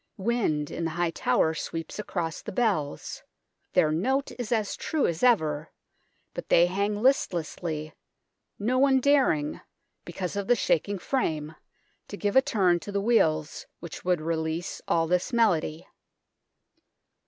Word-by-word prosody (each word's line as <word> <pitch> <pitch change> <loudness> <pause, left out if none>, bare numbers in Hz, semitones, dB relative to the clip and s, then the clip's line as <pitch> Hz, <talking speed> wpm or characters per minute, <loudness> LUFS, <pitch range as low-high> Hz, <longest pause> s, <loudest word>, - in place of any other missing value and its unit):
Wind 190 -9 0
in 170 - -4
the 165 - 0
high 175 -1 +1
tower 160 -1 +1
sweeps 165 +3 -5
across 170 -6 -3
the - - -7
bells; 185 -10 -1 0.5
their 155 - +4
note 265 - 0
is 245 -2 -4
as 220 -3 0
true 310 -3 -1
as 165 -1 -1
ever, 160 -11 +2 0.6
but - - -7
they 170 - +6
hang 200 +3 -1
listlessly, 165 - 0 0.6
no 245 +5 0
one 270 -1 +4
daring, 255 - +2 0.4
because 180 +2 -5
of 200 -1 -3
the 245 - +5
shaking 200 -1 0
frame, 160 - -2 0.5
to 205 - -7
give 205 0 -1
a 265 - +8
turn 185 -8 +2
to 205 - -8
the 200 - 0
wheels 160 -9 +1
which 170 -2 -9
would 180 -3 +1
release 160 +1 -3
all 165 -1 +2
this 180 +6 0
melody. 180 -9 +1
180 Hz, 140 wpm, -27 LUFS, 160-225 Hz, 0.6 s, a